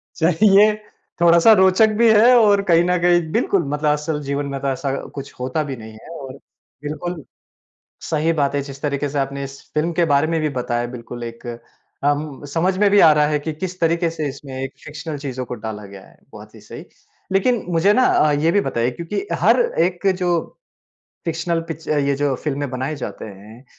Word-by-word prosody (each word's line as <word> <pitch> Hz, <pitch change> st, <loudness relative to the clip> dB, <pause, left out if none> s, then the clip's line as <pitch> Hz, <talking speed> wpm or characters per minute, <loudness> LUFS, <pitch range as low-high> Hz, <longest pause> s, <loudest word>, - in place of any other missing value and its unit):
चाहे 165 Hz, +5 st, +3 dB
ये 210 Hz, +1 st, +6 dB, 0.5 s
थोड़ा-सा 170 Hz, +5 st, +6 dB
रोचक 190 Hz, +2 st, +5 dB
भी 235 Hz, -1 st, +5 dB
है 235 Hz, +4 st, +6 dB
और 205 Hz, -3 st, +4 dB
कहीं 170 Hz, -2 st, +4 dB
न 180 Hz, 0 st, +1 dB
कहीं 175 Hz, 0 st, +4 dB
बिल्कुल 200 Hz, -6 st, +1 dB
मतलब 150 Hz, +1 st, 0 dB
असल 150 Hz, 0 st, -2 dB
जीवन 140 Hz, +1 st, -2 dB
में 135 Hz, -, -3 dB
तो 140 Hz, -, -2 dB
ऐसा 135 Hz, +1 st, -2 dB, 0.2 s
कुछ 140 Hz, 0 st, -7 dB
होता 130 Hz, +5 st, -2 dB
भी 135 Hz, -3 st, -5 dB
नहीं 110 Hz, -1 st, -11 dB
है -, -, -13 dB
और 130 Hz, -1 st, -8 dB, 0.5 s
बिल्कुल 155 Hz, +1 st, -5 dB, 0.9 s
सही 160 Hz, +1 st, +1 dB
बात 145 Hz, -2 st, 0 dB
है। 140 Hz, -, 0 dB
जिस 140 Hz, 0 st, -10 dB
तरीके 145 Hz, -1 st, -2 dB
से 140 Hz, 0 st, -2 dB
आपने 140 Hz, 0 st, -3 dB
इस 135 Hz, 0 st, -8 dB
फ़िल्म 155 Hz, +3 st, 0 dB
के 170 Hz, -, +4 dB
बारे 140 Hz, +3 st, +3 dB
में 165 Hz, -, +1 dB
भी 155 Hz, -, 0 dB
बताया 120 Hz, 0 st, -2 dB
बिल्कुल 120 Hz, 0 st, -8 dB
एक 115 Hz, +1 st, -9 dB, 0.6 s
अम, 145 Hz, 0 st, -1 dB
समझ 175 Hz, +6 st, 0 dB
में 205 Hz, 0 st, +4 dB
भी 205 Hz, -, +5 dB
आ 160 Hz, -4 st, +8 dB
रहा 150 Hz, 0 st, +3 dB
है 150 Hz, -1 st, 0 dB
कि 155 Hz, +2 st, -4 dB
किस 180 Hz, +3 st, -6 dB
तरीके 170 Hz, 0 st, +1 dB
से 155 Hz, -3 st, -4 dB
इसमें 135 Hz, 0 st, -10 dB
एक 135 Hz, -, -6 dB
फ़िक्शनल 150 Hz, +1 st, -7 dB
चीज़ों 130 Hz, -3 st, -5 dB
को 125 Hz, -, -6 dB
डाला 105 Hz, -2 st, -6 dB
गया 100 Hz, -1 st, -12 dB
है। -, -, -22 dB
बहुत -, -, -13 dB
ही -, -, -14 dB
सही। -, -, -10 dB, 0.5 s
लेकिन 220 Hz, +4 st, +1 dB
मुझे 175 Hz, +5 st, +3 dB
ना 255 Hz, -, +3 dB
अ, 150 Hz, -, +3 dB
ये 155 Hz, +3 st, +2 dB
भी 205 Hz, -, +3 dB
बताइए 120 Hz, -5 st, -1 dB
क्योंकि 170 Hz, -, -5 dB, 0.2 s
हर -, -, +5 dB, 0.2 s
एक 180 Hz, +2 st, -1 dB
जो 175 Hz, -2 st, +1 dB, 0.9 s
फ़िक्शनल 165 Hz, 0 st, -1 dB
पिच 160 Hz, 0 st, -7 dB
अ, 150 Hz, -, +1 dB
ये 140 Hz, 0 st, +1 dB
जो 140 Hz, -2 st, 0 dB
फ़िल्में 145 Hz, -1 st, -2 dB
बनाए 130 Hz, +4 st, -3 dB
जाते 135 Hz, -, -7 dB
हैं, 105 Hz, +5 st, -12 dB
150 Hz, 205 wpm, -20 LUFS, 140-175 Hz, 0.9 s, आ